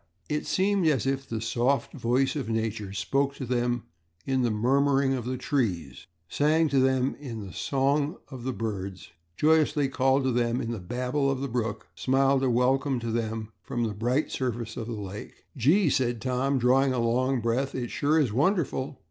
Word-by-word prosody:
It 150 0 -2
seemed 195 -2 +2
as 140 -6 +2
if 135 0 -2
the 115 - -2
soft 120 +3 0
voice 130 +5 +1
of 135 -6 -3
Nature 110 -3 -2
spoke 135 +9 0
to 130 - -5
them 120 -1 0 0.4
in 130 -1 +1
the 120 - +2
murmuring 135 +4 +2
of 125 -3 -3
the 130 +1 -2
trees, 115 - -2 0.2
sang 155 - +2
to 140 -1 +2
them 130 0 +2
in 115 -7 -6
the 95 - -10
song 140 +4 0
of 130 -3 -8
the 130 - -1
birds, 100 -6 -5 0.3
joyously 150 -2 +3
called 135 +1 +2
to 130 - +1
them 120 0 +1
in 115 - -3
the 115 - -4
babble 125 +8 -1
of 135 -1 -1
the 140 - -2
brook, 115 -4 -3
smiled 135 +1 +2
a 130 - +2
welcome 130 +2 +2
to 115 -1 -3
them 110 -1 -3
from 120 -1 -3
the 110 -2 -1
bright 120 +8 0
surface 120 -3 -3
of 115 - -5
the 120 - -4
lake. 105 -1 -8
"Gee!" 155 - +3
said 120 -4 +1
Tom, 130 +3 0
drawing 130 +2 +3
a - - -1
long 125 +3 +1
breath. 125 +4 -1
"It 120 -2 -3
sure 155 +3 +2
is 130 -9 +1
wonderful!" 140 - 0
130 Hz, 190 wpm, -27 LUFS, 115-140 Hz, 0.4 s, joyously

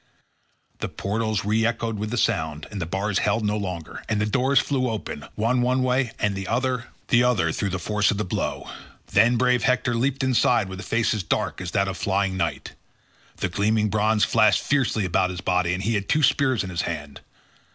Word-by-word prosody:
The - - -3
portals 110 0 -2
re 110 +2 +2
echoed 115 -2 -1
with 105 +1 -3
the 120 - -3
sound, 80 -6 0
the 95 -6 -4
bars 100 +3 -1
held 105 +1 0
no 105 0 +1
longer, 90 -5 -5
and 110 -2 +1
the 105 - +1
doors 130 +5 +1
flew 130 -2 0
open, 110 -2 -5
one 120 +4 +1
one 130 +1 +1
way, 130 -1 +1
and 105 -1 0
the 95 -1 -5
other 125 0 -1 0.2
the 120 - +5
other, 105 -10 +2
through 100 - -2
the 95 - -2
force 105 +3 +1
of 105 - 0
the 105 - -1
blow. 90 - -3 0.4
Then 115 +5 +4
brave 125 0 +2
Hector 125 0 +1
leaped 130 +3 0
inside 125 -5 +2
with 95 0 -7
a - - -6
face 115 0 +1
as 105 - -2
dark 90 - -2
as 90 - -4
that 100 +1 +1
of 95 - -4
flying 100 -1 0
night. 85 -3 -3 0.6
The - - -1
gleaming 105 +3 +1
bronze 110 +1 +2
flashed 110 -2 +3
fiercely 130 -7 +1
about 90 +1 +1
his 90 -1 -5
body 90 -1 +1
and 90 +2 -2
he 115 +3 0
had 100 -2 -2
two 155 - +2
spears 130 -5 +3
in 95 - -6
his 85 0 -1
hand. 75 -4 -5
105 Hz, 210 wpm, -24 LUFS, 95-120 Hz, 0.6 s, the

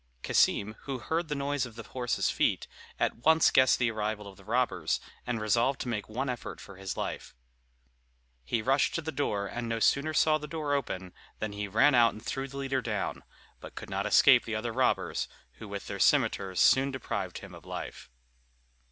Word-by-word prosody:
Cassim, 105 +2 +2
who 135 -2 -3
heard 160 +6 -2
the 150 - -2
noise 140 -2 -1
of 115 - -14
the 115 - -7
horses' 125 -1 -1
feet, - - +1 0.3
at - - 0
once 160 +7 +4
guessed 130 -1 +5
the 120 -2 +1
arrival 105 -1 -3
of 100 - -11
the - - -17
robbers, 105 - 0 0.3
and 120 -2 -1
resolved 115 +5 +1
to - - -4
make 110 -4 -3
one 130 +5 -2
effort 125 -2 -5
for 100 - -12
his 95 -1 -5
life. - - -5 1.1
He 115 - -1
rushed 135 +3 +2
to 165 - -2
the 160 - -3
door, 105 -10 -1
and 120 +3 -4
no 115 - -1
sooner 145 +6 +2
saw 155 -1 +4
the 150 - -7
door 150 -3 -2
open, 95 -10 -3 0.2
than 110 - -3
he 105 0 -4
ran 115 +9 +4
out 120 -2 +5
and 110 +2 -12
threw 135 0 -3
the 140 +1 -9
leader 135 -1 -1
down, 105 -4 -3 0.4
but - - -11
could - - -8
not - - -1
escape - - +6
the - - -4
other - - -3
robbers, - - +1 0.3
who 110 - -8
with 100 -1 -6
their 100 - -5
cimeters 100 -9 +2
soon 135 +1 +5
deprived 105 -8 -4
him - - -10
of - - -12
life. - - -7
120 Hz, 200 wpm, -29 LUFS, 105-140 Hz, 1.1 s, escape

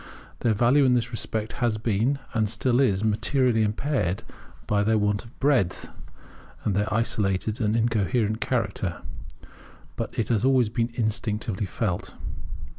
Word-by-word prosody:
Their 115 -3 +2
value 125 +6 +4
in 125 -2 +4
this 120 - 0
respect 110 -1 -3
has 115 -3 +2
been 115 +5 +1 0.2
and 110 -3 +1
still 120 +3 +2
is 105 -7 +2
materially 115 +2 +2
impaired 105 - 0 0.4
by 105 -1 +1
their 110 +1 +3
want 105 -1 +1
of 115 +3 -17
breadth, 135 -10 +1 0.7
and 100 - 0
their 105 +1 0
isolated 110 0 0
and 105 0 +1
incoherent 110 0 +1
character; 100 -7 -1 0.9
but - - -5
it 115 - 0
has 115 -3 +2
always 130 -4 +4
been 115 +1 0
instinctively 110 -2 -1
felt. 95 -5 -3
110 Hz, 140 wpm, -25 LUFS, 105-120 Hz, 0.9 s, value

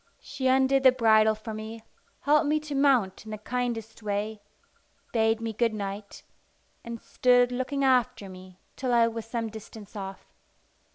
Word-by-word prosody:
She 260 - -3
undid 265 +1 +4
the 260 -1 +7
bridle 220 -3 +4
for 215 +1 -7
me, 220 +1 -7 0.4
helped 300 0 +3
me 305 +1 +2
to 300 -1 -6
mount 265 -10 +2
in 220 - -11
the 215 - -5
kindest 230 0 -4
way, 210 +1 -3 0.7
bade 225 -1 +2
me 225 -1 -4
good 230 0 0
night, 200 0 -6 0.6
and 235 0 -6
stood 245 +1 +3
looking 260 +3 -2
after 250 -6 +2
me 185 -1 -12 0.2
till 255 -2 -1
I 230 -1 +5
was 230 -1 -5
some 230 -1 -3
distance 220 -1 -11
off. 195 -1 -8
225 Hz, 160 wpm, -27 LUFS, 215-255 Hz, 0.7 s, the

